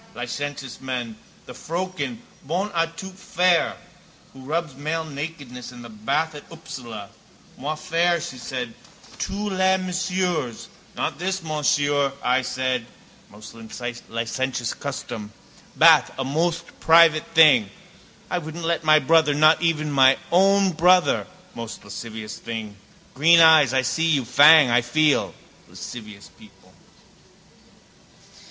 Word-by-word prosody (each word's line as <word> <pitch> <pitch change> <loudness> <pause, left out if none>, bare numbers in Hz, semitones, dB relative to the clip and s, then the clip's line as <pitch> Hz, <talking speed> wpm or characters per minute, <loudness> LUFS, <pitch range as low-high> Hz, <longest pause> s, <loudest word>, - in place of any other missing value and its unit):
Licentious 145 - -6
men. 125 -4 -4 0.3
The - - -10
froeken, 185 +7 -5 0.2
bonne 180 +8 -3
à 165 -2 0
tout 190 +2 -8
faire, 180 -2 +1 0.6
who 135 - -14
rubs 165 +1 -3
male 155 +4 -3
nakedness 140 -5 -8
in 120 -1 -12
the 115 - -11
bath 140 +9 -2
at 145 - -10
Upsala. 120 -10 -9 0.5
Moi 150 +4 -4
faire, 170 +2 0
she 155 -6 -7
said, 125 -1 -5 0.5
Tous 205 +1 -3
les 190 0 +2
messieurs. 180 -8 -3 0.3
Not - - -3
this 190 0 -3
Monsieur, 145 -2 0
I 125 +1 +2
said. 125 -1 -2 0.4
Most 105 +2 -13 0.6
licentious 120 +1 -3
custom. 110 -6 -7 0.4
Bath - - +6
a 135 - -2
most 165 +5 -2
private 165 -1 +5
thing. 140 -10 +6 0.6
I 180 - 0
wouldn't 165 +1 -7
let 165 0 -1
my 155 0 +5
brother, 155 0 +3
not 155 +2 +4
even 155 -3 0
my 135 -1 +5
own 195 +2 +4
brother, 180 +2 +3 0.3
most 115 -1 -8
lascivious 110 +1 -8
thing. 110 -3 -7 0.4
Green 165 +5 +5
eyes, 160 -5 +6
I 130 0 +1
see 165 +5 0
you. 145 -6 +1
Fang, 145 +2 +6
I 120 +1 +4
feel. 150 +5 +1 0.3
Lascivious 105 -4 -10
people. - - -20
150 Hz, 125 wpm, -23 LUFS, 125-170 Hz, 0.6 s, Bath